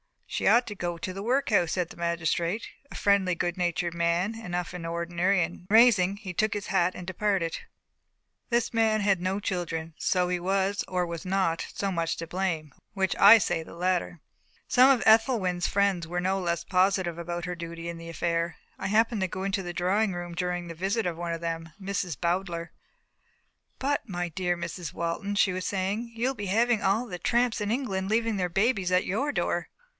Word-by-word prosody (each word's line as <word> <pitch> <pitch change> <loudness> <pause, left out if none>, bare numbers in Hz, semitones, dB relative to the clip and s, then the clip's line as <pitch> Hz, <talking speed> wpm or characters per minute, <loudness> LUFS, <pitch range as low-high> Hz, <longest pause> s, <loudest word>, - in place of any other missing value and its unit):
"She - - -2
ought 240 +1 +5
to 210 - -5
go 175 -2 -3
to 185 +2 -5
the 195 - -6
workhouse," 225 - +2
said 180 -2 -1
the - - -12
magistrate 170 +4 -1 0.2
a - - -10
friendly, 195 -3 +2
good 175 +1 -1
natured 175 -1 -1
man 170 +4 +1
enough 180 -6 -4
in 180 -2 -6
ordinary 170 +3 +1
and 175 +2 -7
rising, 205 -4 +5
he 195 -3 -7
took 215 +3 +1
his 205 - -4
hat 180 -2 +1
and 180 - -7
departed. 185 -2 -1 0.9
This 235 -1 +1
man 220 -1 +2
had 195 -3 +2
no 185 +2 -1
children. 165 -4 -3
So 180 -1 +1
he 180 0 0
was 195 +2 0
or 180 -1 0
was 170 -1 -6
not, 185 -3 0
so 200 -1 -1
much 165 -2 -1
to 165 - -4
blame. 165 -4 -2 0.2
Which? 190 -2 0
I 205 +3 +9
say 175 -5 0
the 160 - -11
latter. 180 -2 -1 0.5
Some 255 +1 +6
of 260 -4 +4
Ethelwyn's 220 -6 +3
friends 195 -4 +1
were 175 +1 -2
no 190 +2 0
less 170 -2 -1
positive 185 -2 +1
about 175 0 -4
her 180 - -3
duty 170 -1 -7
in 170 -1 -5
the 165 0 -9
affair. 170 0 -1 0.2
I - - -2
happened 220 +1 +2
to 190 - +1
go 185 +1 -5
into 195 0 -1
the 175 -1 -5
drawing 190 +4 +1
room 175 0 -5
during 180 0 -2
the 170 - -7
visit 195 +7 -1
of 170 -2 -2
one 170 0 -3
of 165 - -5
them 165 -1 -4
Miss 195 -3 -3
Bowdler. 170 -1 -2 1.1
"But, 280 -3 -1
my 175 -1 -2
dear 175 +1 -1
Mrs. 170 0 -5
Walton," 170 +5 -2
she 195 -2 +3
was 185 0 -3
saying, 205 +5 -2
"you'll 245 +4 0
be 205 -6 -5
having 230 +3 +2
all 200 +6 +2
the 180 -6 -7
tramps 240 0 +1
in 205 - -1
England 200 -6 -1
leaving 225 -1 +1
their 180 -1 0
babies 195 0 +1
at 180 0 +3
your 270 +10 0
door." - - -1
185 Hz, 200 wpm, -27 LUFS, 170-205 Hz, 1.1 s, I